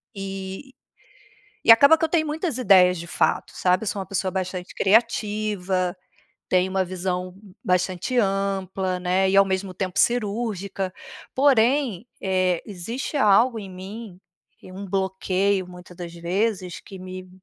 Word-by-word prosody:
E 195 Hz, +6 st, -7 dB, 0.9 s
e 230 Hz, -, +9 dB
acaba 280 Hz, +7 st, +8 dB
que 325 Hz, -, +1 dB
eu -, -, -4 dB
tenho 315 Hz, -2 st, +1 dB
muitas 310 Hz, -3 st, -2 dB
ideias 185 Hz, -5 st, +5 dB
de 170 Hz, -, -7 dB
fato, -, -, 0 dB
sabe? 180 Hz, +4 st, +1 dB
Eu -, -, -4 dB
sou 200 Hz, -, -2 dB
uma 190 Hz, -, -4 dB
pessoa 190 Hz, 0 st, -2 dB
bastante 185 Hz, -1 st, -4 dB
criativa, 200 Hz, -3 st, +1 dB, 0.5 s
tenho 185 Hz, 0 st, +2 dB
uma 190 Hz, 0 st, +1 dB
visão 180 Hz, 0 st, -3 dB, 0.3 s
bastante 185 Hz, +6 st, 0 dB
ampla, 195 Hz, -2 st, -1 dB
né, 185 Hz, +1 st, +1 dB
e 195 Hz, -, +2 dB
ao 195 Hz, -, +7 dB
mesmo 190 Hz, 0 st, -2 dB
tempo 185 Hz, +1 st, -3 dB
cirúrgica. 200 Hz, -5 st, -1 dB, 0.4 s
Porém, 260 Hz, -4 st, +3 dB, 0.2 s
eh, 185 Hz, -2 st, +1 dB
existe 225 Hz, -, -5 dB
algo 230 Hz, +1 st, +4 dB
em 195 Hz, -2 st, -9 dB
mim, 190 Hz, +1 st, -9 dB, 0.4 s
que -, -, -16 dB
é -, -, -12 dB
um 195 Hz, +2 st, -7 dB
bloqueio 190 Hz, 0 st, 0 dB
muita 180 Hz, 0 st, -12 dB
das 170 Hz, -1 st, -8 dB
vezes, 180 Hz, +2 st, -2 dB
que 195 Hz, -, -11 dB
me 185 Hz, 0 st, -8 dB
190 Hz, 150 wpm, -23 LUFS, 185-215 Hz, 0.9 s, e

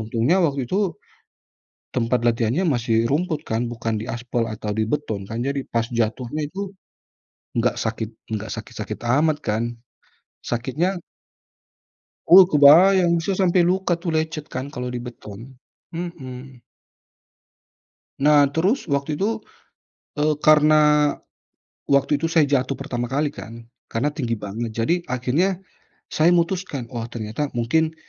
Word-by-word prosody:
untungnya 115 Hz, -, +1 dB
waktu 140 Hz, -6 st, +1 dB
itu, 195 Hz, -, -1 dB, 1.0 s
tempat 120 Hz, -1 st, 0 dB
latihannya 120 Hz, -, +1 dB
masih 115 Hz, -6 st, +1 dB
rumput 155 Hz, +4 st, -1 dB
kan, 115 Hz, +2 st, -2 dB
bukan 115 Hz, -1 st, -3 dB
di 120 Hz, -, -7 dB
aspal 120 Hz, 0 st, -2 dB
atau 110 Hz, -1 st, -4 dB
di 110 Hz, +1 st, -1 dB
beton 110 Hz, -10 st, -3 dB
kan. 115 Hz, -, -4 dB
Jadi 140 Hz, -1 st, -3 dB
pas 115 Hz, -1 st, 0 dB
jatuhnya 120 Hz, +5 st, -2 dB
itu 195 Hz, +3 st, -6 dB, 0.8 s
nggak 120 Hz, 0 st, +2 dB
sakit, 110 Hz, -1 st, -3 dB, 0.3 s
nggak 110 Hz, +2 st, -7 dB
sakit-sakit 110 Hz, -1 st, -7 dB
amat 145 Hz, +6 st, +2 dB
kan. 110 Hz, -2 st, -1 dB, 0.8 s
Sakitnya 135 Hz, +10 st, -2 dB, 1.4 s
Oh 185 Hz, 0 st, +10 dB
kebayang 170 Hz, +4 st, +6 dB
bisa 190 Hz, +4 st, -1 dB
sampai 180 Hz, -2 st, +3 dB
luka 185 Hz, -2 st, 0 dB
tuh 170 Hz, -2 st, -2 dB
lecet 155 Hz, -1 st, -2 dB
kan 130 Hz, +3 st, -6 dB
kalau 125 Hz, -3 st, -5 dB
di 125 Hz, 0 st, -4 dB
beton. 115 Hz, 0 st, -10 dB, 0.4 s
Hmm. 135 Hz, -7 st, -7 dB, 1.7 s
Nah 145 Hz, 0 st, +6 dB
terus 190 Hz, -, +1 dB
waktu 140 Hz, 0 st, -1 dB
itu, 220 Hz, +4 st, -1 dB, 0.7 s
eee, 150 Hz, 0 st, +1 dB
karena 150 Hz, -1 st, +5 dB, 0.8 s
waktu 140 Hz, +1 st, +3 dB
itu 165 Hz, -, 0 dB
saya 160 Hz, -3 st, +4 dB
jatuh 135 Hz, -1 st, 0 dB
pertama 120 Hz, -1 st, -4 dB
kali 145 Hz, +2 st, 0 dB
kan, 115 Hz, -3 st, -10 dB, 0.2 s
karena 120 Hz, +6 st, 0 dB
tinggi 120 Hz, -7 st, -2 dB
banget. 110 Hz, +3 st, -5 dB
Jadi, 165 Hz, +10 st, +2 dB
akhirnya 140 Hz, +10 st, 0 dB, 0.6 s
saya 155 Hz, +2 st, +3 dB
memutuskan, 170 Hz, -6 st, -1 dB
"Oh 115 Hz, -2 st, -4 dB
ternyata 115 Hz, +5 st, -4 dB
mungkin, 160 Hz, +7 st, +1 dB
140 Hz, 130 wpm, -22 LUFS, 115-160 Hz, 1.7 s, Oh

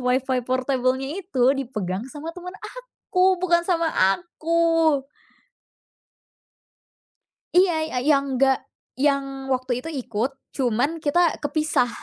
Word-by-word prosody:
Wi-Fi 255 Hz, +1 st, +1 dB
portable-nya 260 Hz, 0 st, 0 dB
itu 265 Hz, -8 st, +2 dB
dipegang 215 Hz, -6 st, -3 dB
sama 310 Hz, +4 st, -7 dB
teman 360 Hz, +1 st, -9 dB
aku, 380 Hz, -7 st, 0 dB
bukan 345 Hz, -2 st, +3 dB
sama 335 Hz, -3 st, +1 dB, 0.3 s
aku. 330 Hz, -4 st, +1 dB, 2.5 s
Iya, 360 Hz, 0 st, +5 dB, 0.3 s
y 250 Hz, -, -2 dB
yang 275 Hz, -2 st, 0 dB
enggak, 265 Hz, 0 st, +3 dB, 0.3 s
yang 275 Hz, -1 st, -1 dB
waktu 255 Hz, -1 st, -1 dB
itu 325 Hz, -, -7 dB
ikut, 250 Hz, -4 st, -2 dB, 0.2 s
cuman 265 Hz, +5 st, 0 dB
kita 330 Hz, +3 st, +2 dB
kepisah. 300 Hz, -4 st, +1 dB
275 Hz, 105 wpm, -23 LUFS, 255-330 Hz, 2.5 s, Iya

